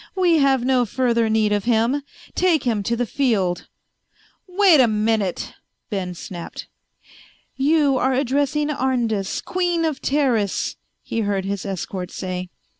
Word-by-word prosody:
"We 350 -4 +3
have 270 -3 +3
no 255 -1 +3
further 235 -1 +1
need 220 -1 +2
of 205 -1 -1
him. 240 +4 +2 0.3
Take 355 -4 +2
him 225 -4 0
to 230 +4 -1
the 245 +1 -1
field." 215 -9 0 0.8
"Wait 365 -4 +5
a 245 - +5
minute," 215 -3 0 0.4
Ben 185 -3 -3
snapped. 175 0 -8 0.9
"You 285 -1 +3
are 260 +2 +2
addressing 285 +3 0
Arndis, 240 -8 -1
Queen 350 -2 0
of 305 -4 -2
Teris," 250 -9 0 0.3
he 230 - -3
heard 200 -3 -1
his 200 0 -3
escort 185 -1 -4
say. 185 -1 -5
240 Hz, 135 wpm, -22 LUFS, 205-285 Hz, 0.9 s, Wait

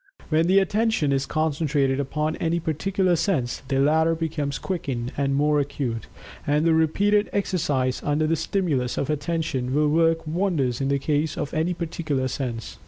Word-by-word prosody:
When 160 +1 +2
the 190 +2 +4
Attention 205 -5 +2
is 135 0 0
concentrated 145 -3 0
upon 150 +3 -1
any 170 0 0
particular 180 +3 0
sense, 160 - -1
the 135 - 0
latter 160 +3 +3
becomes 155 -4 -2
quickened 130 -10 -3
and 140 -1 0
more 150 +1 +3
acute, 135 -5 -3 0.4
and 150 +3 +2
repeated 200 +6 +2
exercise, 145 -10 0
under 150 +2 +1
the 165 +1 +2
stimulus 145 -9 -1
of 140 +2 -1
Attention, 145 -4 -2
will 150 0 +3
work 165 +1 +2
wonders 155 -7 0
in 135 - 0
the 140 0 +2
case 150 +2 -1
of 145 - -3
any 165 +3 0
particular 155 -6 -2
sense. 125 -4 -5
150 Hz, 160 wpm, -24 LUFS, 140-165 Hz, 0.4 s, the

